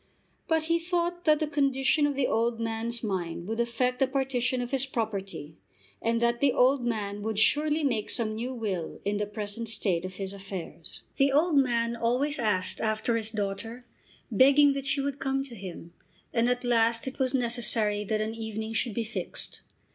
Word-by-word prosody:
But 320 -1 +2
he 335 +1 +1
thought 350 0 -2
that 305 -2 +5
the 310 - +1
condition 280 0 +2
of 285 - -2
the 270 -1 +1
old 230 0 0
man's 230 +1 -2
mind 175 -5 -3
would 225 +2 -3
affect 245 +2 0
the 270 - +3
partition 260 -2 0
of 245 0 -4
his 270 -2 +3
property, 195 - -4 0.4
and 230 0 +1
that 235 0 +1
the 280 -3 +3
old 255 +1 +3
man 205 -3 -2
would 220 0 -3
surely 300 +7 +3
make 230 -7 0
some 220 -2 0
new 235 +4 -3
will 205 -9 -4
in 205 0 0
the 205 0 -1
present 210 +2 -5
state 195 -6 0
of 185 0 -6
his 195 0 -4
affairs. 190 -3 -5 0.2
The 275 0 +4
old 310 +3 +3
man 235 -4 +2
always 250 +6 +1
asked 205 -6 +1
after 220 +1 0
his 220 -1 0
daughter, 220 +3 -4 0.5
begging 280 +5 +6
that 275 0 -4
she 275 +1 +1
would 280 0 -3
come 270 0 0
to 270 -3 -7
him, 180 -5 -9 0.4
and 235 0 +2
at 250 0 0
last 230 -1 +2
it 265 +1 -6
was 260 0 +1
necessary 230 -4 +2
that 215 +1 -1
an 215 +1 -2
evening 220 0 -5
should 225 -1 0
be 235 - 0
fixed. 225 - -4
235 Hz, 190 wpm, -28 LUFS, 215-270 Hz, 0.5 s, begging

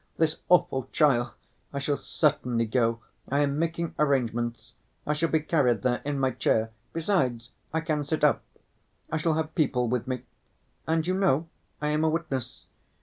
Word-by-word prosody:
This 160 -1 +2
awful 135 -8 +3
trial... 120 -6 +3 0.4
I 140 - -5
shall 140 +1 0
certainly 135 -7 +1
go, 115 0 +1 0.3
I 140 +2 +2
am 145 0 +1
making 165 0 -1
arrangements. 120 -5 0 0.3
I 150 - +1
shall 160 +2 0
be 160 - +2
carried 135 - +2
there 125 -1 +1
in 145 0 -2
my 135 -1 +2
chair; 110 -1 +1 0.2
besides 135 - 0 0.2
I 160 - 0
can 155 -2 -1
sit 155 +1 -2
up. 150 - +4 0.7
I 155 - +1
shall 160 0 +1
have 160 0 -2
people 130 -7 +1
with 125 +1 -1
me. 130 -2 -3 0.6
And, 160 0 +1
you 185 - +1
know, 170 -5 +2 0.3
I 150 - +1
am 150 +1 +1
a 160 - +4
witness. 135 -7 -3
145 Hz, 170 wpm, -27 LUFS, 125-160 Hz, 0.7 s, up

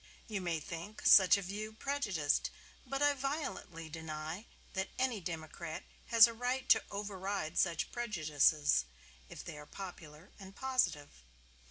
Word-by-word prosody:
You 210 -3 -3
may 170 -3 -1
think 170 +7 -8
such 190 0 +8
a 200 - -4
view 210 +4 -5
prejudiced; 210 - 0 0.4
but 275 +1 -1
I 290 0 +5
violently 270 - -4
deny 160 +4 -6 0.3
that 190 0 -2
any 255 -5 0
democrat 165 -1 -5 0.2
has 230 -1 +9
a 230 - -2
right 250 +3 -2
to 220 - +6
override 195 -4 -3
such 170 -3 +1
prejudices, 155 - +2 0.4
if - - -8
they 150 - -7
are 150 - -11
popular 175 -3 -9
and 195 0 -11
positive. 250 - 0
190 Hz, 140 wpm, -34 LUFS, 160-230 Hz, 0.4 s, has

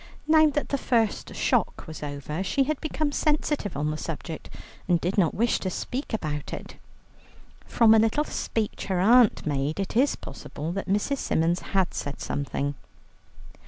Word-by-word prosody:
Now 315 0 +6
that 295 0 -2
the 280 - 0
first 230 -5 0
shock - - +1
was 160 -1 -8
over, 150 +3 -4
she 235 +9 +1
had 300 +1 -2
become 310 -1 -1
sensitive 295 - 0
on 150 +1 0
the 155 - -3
subject, 165 0 -6 0.4
and 175 -2 +3
did 180 +4 -1
not 175 -6 +2
wish 235 +2 +2
to 190 - -2
speak 255 - -4
about 150 -9 -3
it. - - -7 0.9
From 225 -2 +5
a 220 - +6
little 225 +7 +2
speech 220 -7 -3
her 190 -2 0
aunt 230 +4 +5
made, 145 +2 -1
it 195 - -3
is 270 +5 +3
possible 155 +3 -7
that 195 +1 -4
Mrs. 210 +8 +1
Symons 170 +2 +1
had 190 -3 0
said 145 - -4
something. 140 0 -2
195 Hz, 165 wpm, -26 LUFS, 160-255 Hz, 0.9 s, Now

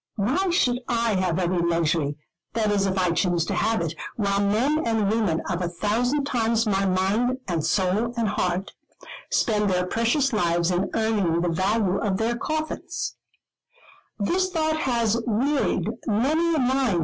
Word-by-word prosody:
Why 265 - 0
should 250 -8 +2
I 230 -2 +1
have 185 -3 0
every 180 -1 0
luxury, 165 -3 +1 0.4
that 215 -2 +1
is 200 -1 +1
if 190 0 -1
I 180 -2 +2
choose 170 -1 +1
to - - -3
have 220 -2 +1
it, 165 -1 -2 0.2
while 200 -2 0
men 240 +10 +1
and 220 -3 +1
women 215 -8 0
of 180 -1 -2
a 175 - -1
thousand 230 +10 0
times 230 -3 +1
my 195 -2 +1
mind, 200 +7 +1
and 170 -4 -1
soul, 205 +6 +1
and 225 -3 +1
heart, 185 -1 -1 0.6
spend 210 -2 +1
their 180 -1 +1
precious 235 +7 +1
lives 175 -3 +1
in 180 +2 0
earning 205 -7 +1
the 175 - 0
value 195 +3 +1
of 200 -3 0
their 230 +3 0
coffins? 310 +5 -4
200 Hz, 135 wpm, -24 LUFS, 180-230 Hz, 0.6 s, should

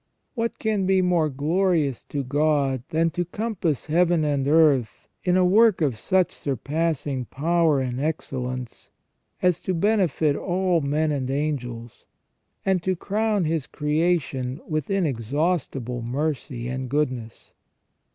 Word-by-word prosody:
What 230 -2 -2
can 210 -4 0
be 190 -1 +3
more 175 -4 +2
glorious 155 -1 0
to 140 -1 -3
God 140 -1 +1
than 165 +1 +1
to 175 +1 -1
compass 180 - -2
Heaven 170 0 +2
and 140 -2 0
earth 145 -8 +3 0.2
in 180 0 +2
a 185 - +4
work 215 +2 +5
of 145 -7 +1
such 185 +11 +1
surpassing 145 0 -2
power 160 +2 +1
and 125 -1 -2
excellence 130 -5 -4 0.5
as 180 -2 +2
to 185 - -2
benefit 170 -6 +2
all 180 -1 0
men 150 +2 0
and 135 -3 -2
angels, 125 -5 -3 0.6
and 190 -2 +2
to 185 +1 0
crown 210 +1 0
His 155 -3 -1
creation 150 -4 -1
with 155 -3 -2
inexhaustible 140 - -1
mercy 130 -1 -3
and 130 0 -4
goodness 130 -5 -3
155 Hz, 130 wpm, -24 LUFS, 135-180 Hz, 0.6 s, work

